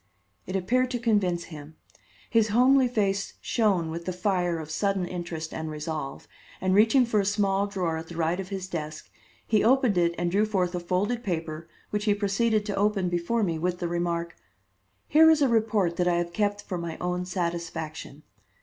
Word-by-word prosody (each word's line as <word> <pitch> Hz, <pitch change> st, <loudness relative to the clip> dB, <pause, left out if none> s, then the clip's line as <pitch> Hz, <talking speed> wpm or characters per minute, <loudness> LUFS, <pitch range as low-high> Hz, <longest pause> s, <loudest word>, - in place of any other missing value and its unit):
It 185 Hz, -, -4 dB
appeared 245 Hz, +7 st, +1 dB
to 250 Hz, -1 st, -2 dB
convince 200 Hz, -7 st, +1 dB
him. 150 Hz, +1 st, -10 dB, 0.5 s
His 225 Hz, -2 st, +3 dB
homely 255 Hz, +4 st, +4 dB
face 200 Hz, -4 st, -1 dB
shone 195 Hz, -8 st, +1 dB
with 170 Hz, +1 st, -6 dB
the 185 Hz, -, -2 dB
fire 180 Hz, -2 st, 0 dB
of 160 Hz, -1 st, -7 dB
sudden 195 Hz, +3 st, 0 dB
interest 170 Hz, -3 st, -5 dB
and 160 Hz, 0 st, -4 dB
resolve, 150 Hz, -2 st, -5 dB, 0.3 s
and, 185 Hz, 0 st, +1 dB
reaching 225 Hz, +6 st, +5 dB
for 220 Hz, -3 st, +1 dB
a -, -, +2 dB
small 200 Hz, 0 st, +1 dB
drawer 180 Hz, -5 st, -2 dB
at 160 Hz, 0 st, -7 dB
the 170 Hz, -, -9 dB
right 170 Hz, +2 st, 0 dB
of 190 Hz, -1 st, -5 dB
his 190 Hz, -2 st, -4 dB
desk, 155 Hz, -3 st, -6 dB, 0.3 s
he 215 Hz, -2 st, +2 dB
opened 245 Hz, -5 st, +3 dB
it 170 Hz, 0 st, +2 dB
and 175 Hz, 0 st, -1 dB
drew 210 Hz, +3 st, +2 dB
forth 185 Hz, -4 st, 0 dB
a 180 Hz, -, -1 dB
folded 200 Hz, +7 st, -1 dB
paper 165 Hz, -3 st, -4 dB, 0.2 s
which 210 Hz, 0 st, -1 dB
he 205 Hz, -2 st, +3 dB
proceeded 210 Hz, +1 st, +1 dB
to 205 Hz, -2 st, -2 dB
open 200 Hz, -2 st, +1 dB
before 175 Hz, +7 st, 0 dB
me 165 Hz, -4 st, -1 dB
with 180 Hz, +2 st, -1 dB
the 175 Hz, -, -3 dB
remark: 170 Hz, 0 st, -2 dB, 0.7 s
"Here 320 Hz, +1 st, +7 dB
is 310 Hz, -2 st, +4 dB
a -, -, +4 dB
report 215 Hz, -7 st, +1 dB
that 180 Hz, -, +1 dB
I 175 Hz, -, +3 dB
have 170 Hz, 0 st, -2 dB
kept 205 Hz, +1 st, 0 dB
for 180 Hz, -, -4 dB
my 170 Hz, -1 st, -5 dB
own 180 Hz, 0 st, -2 dB
satisfaction. 170 Hz, -4 st, -4 dB
185 Hz, 195 wpm, -27 LUFS, 170-210 Hz, 0.7 s, Here